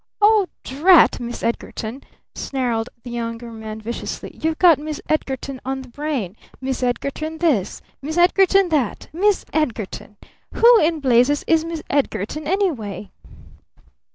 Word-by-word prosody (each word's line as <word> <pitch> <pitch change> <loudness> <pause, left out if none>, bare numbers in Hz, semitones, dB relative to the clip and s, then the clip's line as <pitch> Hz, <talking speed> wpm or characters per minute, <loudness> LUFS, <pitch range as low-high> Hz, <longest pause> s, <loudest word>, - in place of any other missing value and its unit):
"Oh 420 -2 +5 0.2
drat 325 +7 +5
Miss 240 -1 -6
Edgarton!" 230 +2 -4 0.3
snarled 245 -4 -2
the 245 - -8
Younger 230 0 -5
Man 220 -1 -7
viciously. 230 +2 -5
"You've 320 0 0
got 340 -5 +6
Miss 305 0 -5
Edgarton 270 -3 -2
on 265 0 -3
the 255 - -14
brain! 260 - -3 0.2
Miss 265 0 -3
Edgarton 280 +5 -2
this! 285 - 0 0.2
Miss 310 +4 -4
Edgarton 380 +1 +4
that! 285 -9 -1
Miss 395 +4 +2
Edgarton! 220 -8 -3 0.4
Who 470 0 +7
in 315 0 +1
blazes 260 +2 +3
is 325 -1 +3
Miss 330 -1 -5
Edgarton, 280 +1 -1
anyway?" 235 - -2
275 Hz, 130 wpm, -21 LUFS, 235-320 Hz, 0.4 s, Who